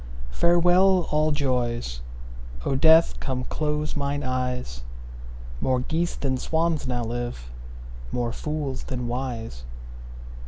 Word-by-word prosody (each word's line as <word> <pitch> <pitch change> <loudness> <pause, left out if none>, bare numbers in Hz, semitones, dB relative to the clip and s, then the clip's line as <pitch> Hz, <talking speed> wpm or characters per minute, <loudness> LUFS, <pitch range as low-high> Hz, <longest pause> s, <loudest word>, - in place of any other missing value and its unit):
Farewell, 175 - +4
all 155 +1 +3
joys; 120 - -1 0.6
O - - +1
Death, 160 +4 +6
come 130 -1 -2
close 150 +2 -2
mine 145 0 -1
eyes; 125 - -2 0.8
More 130 -1 +1
geese 165 +6 -1
than 130 -2 -1
swans 160 -1 0
now 120 -1 -1
live, 120 - -4 0.6
more 120 - -1
fools 150 -3 -3
than 125 -2 -3
wise. 120 - -4
130 Hz, 110 wpm, -25 LUFS, 120-155 Hz, 0.8 s, Death